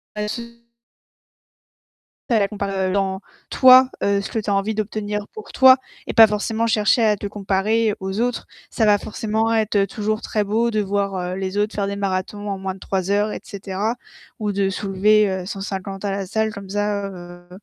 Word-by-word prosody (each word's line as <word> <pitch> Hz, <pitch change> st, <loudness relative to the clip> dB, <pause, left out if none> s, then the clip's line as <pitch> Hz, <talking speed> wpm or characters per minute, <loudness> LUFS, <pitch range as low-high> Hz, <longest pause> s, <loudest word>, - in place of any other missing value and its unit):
Pas 210 Hz, -, -3 dB
de -, -, -5 dB
sou 235 Hz, -1 st, -7 dB, 1.7 s
Pas 230 Hz, -3 st, +3 dB
la 200 Hz, -, +2 dB
comparer, 195 Hz, -2 st, -2 dB
heu, -, -, -1 dB
dans 190 Hz, -1 st, -1 dB, 0.3 s
toi, 255 Hz, 0 st, +7 dB, 0.2 s
heu, 200 Hz, 0 st, +2 dB
ce 200 Hz, -, -6 dB
que 225 Hz, -, -2 dB
tu 210 Hz, -1 st, -2 dB
as -, -, +2 dB
envie 200 Hz, +2 st, 0 dB
d'obtenir 210 Hz, -1 st, -3 dB
pour 435 Hz, -, -10 dB
toi 260 Hz, 0 st, +7 dB, 0.3 s
et -, -, -3 dB
pas 225 Hz, -2 st, +8 dB
forcément 220 Hz, +2 st, -1 dB
chercher 220 Hz, +2 st, +3 dB
à 210 Hz, -2 st, +3 dB
te 205 Hz, -, -6 dB
comparer 205 Hz, +2 st, 0 dB
aux 190 Hz, +3 st, -4 dB
autres. 245 Hz, 0 st, -1 dB, 0.2 s
Ça 220 Hz, -, 0 dB
va 205 Hz, -1 st, +5 dB
forcément 220 Hz, +1 st, -1 dB
être 215 Hz, -2 st, +2 dB
toujours 215 Hz, +2 st, -2 dB
très 210 Hz, -1 st, -1 dB
beau 225 Hz, +3 st, +1 dB
de 215 Hz, -1 st, 0 dB
voir, 200 Hz, -1 st, -1 dB, 0.2 s
heu, -, -, -2 dB
les 190 Hz, +1 st, -4 dB
autres 210 Hz, +1 st, 0 dB
faire 200 Hz, -1 st, -1 dB
des 200 Hz, -, -3 dB
marathons 200 Hz, +1 st, -3 dB
en 195 Hz, -, -2 dB
moins 190 Hz, 0 st, -4 dB
de -, -, -13 dB
3 190 Hz, 0 st, -3 dB
heures 205 Hz, +1 st, +1 dB
et -, -, -6 dB
cetera 200 Hz, +4 st, -4 dB, 0.4 s
ou 210 Hz, -2 st, -2 dB
de 195 Hz, 0 st, 0 dB
soulever, 205 Hz, +2 st, +2 dB
heu, 190 Hz, -1 st, -3 dB
150 195 Hz, 0 st, -5 dB
à 200 Hz, -, -1 dB
la 195 Hz, 0 st, -2 dB
salle 220 Hz, +2 st, -1 dB
comme 195 Hz, -1 st, -9 dB
ça, 205 Hz, 0 st, -1 dB
heu 175 Hz, -1 st, -11 dB
205 Hz, 205 wpm, -21 LUFS, 195-220 Hz, 1.7 s, pas